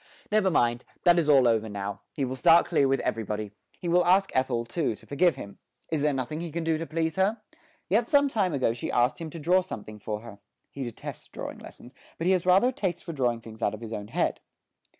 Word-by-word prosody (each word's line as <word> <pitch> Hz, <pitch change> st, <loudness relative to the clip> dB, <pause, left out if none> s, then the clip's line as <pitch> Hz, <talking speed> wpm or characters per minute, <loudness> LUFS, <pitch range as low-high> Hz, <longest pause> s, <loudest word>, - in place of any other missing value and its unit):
Never 210 Hz, -2 st, +3 dB
mind, 120 Hz, -6 st, +1 dB, 0.2 s
that 175 Hz, -1 st, +6 dB
is 155 Hz, -3 st, 0 dB
all 135 Hz, -4 st, +6 dB
over 110 Hz, -1 st, +1 dB
now; 100 Hz, 0 st, -5 dB
he 140 Hz, -, -2 dB
will 130 Hz, +1 st, -4 dB
start 165 Hz, +6 st, +6 dB
clear 150 Hz, -5 st, +2 dB
with 135 Hz, 0 st, +1 dB
everybody. 105 Hz, -1 st, -3 dB, 0.3 s
He 175 Hz, -, -6 dB
will 175 Hz, +1 st, +4 dB
ask 190 Hz, +3 st, +3 dB
Ethel, 130 Hz, -3 st, 0 dB
too, 115 Hz, -1 st, -1 dB
to -, -, -19 dB
forgive 170 Hz, +4 st, +2 dB
him. 100 Hz, -, -10 dB, 0.3 s
Is 155 Hz, -3 st, 0 dB
there 150 Hz, 0 st, +3 dB
nothing 135 Hz, +4 st, -3 dB
he 170 Hz, -2 st, -5 dB
can 170 Hz, +2 st, -3 dB
do 160 Hz, -1 st, 0 dB
to 165 Hz, -, -4 dB
please 160 Hz, 0 st, -2 dB
her? 205 Hz, +4 st, +2 dB, 0.5 s
Yes 225 Hz, +4 st, +1 dB
some 285 Hz, -1 st, +5 dB
time 205 Hz, -9 st, 0 dB
ago 130 Hz, -6 st, +1 dB
she 120 Hz, -, -5 dB
had -, -, -2 dB
asked 125 Hz, +7 st, +2 dB
him 165 Hz, -, -5 dB
to 165 Hz, -, -8 dB
draw 180 Hz, +4 st, +3 dB
something 110 Hz, -, -8 dB
for 105 Hz, +1 st, -4 dB
her. 110 Hz, -3 st, -11 dB, 0.3 s
(He 140 Hz, -, -5 dB
detests 120 Hz, -3 st, -7 dB
drawing -, -, -7 dB
lessons, 125 Hz, -, -13 dB, 0.2 s
but 165 Hz, -, -3 dB
he 185 Hz, -, +4 dB
has 180 Hz, -1 st, 0 dB
rather 190 Hz, +7 st, +5 dB
a -, -, -5 dB
taste 185 Hz, -7 st, -2 dB
for 170 Hz, -, -6 dB
drawing 120 Hz, -5 st, 0 dB
things 110 Hz, 0 st, -12 dB
out 105 Hz, -, +1 dB
of 110 Hz, -, -13 dB
his 115 Hz, -1 st, -6 dB
own 105 Hz, -1 st, -5 dB
head.) -, -, -1 dB
145 Hz, 245 wpm, -27 LUFS, 115-175 Hz, 0.5 s, that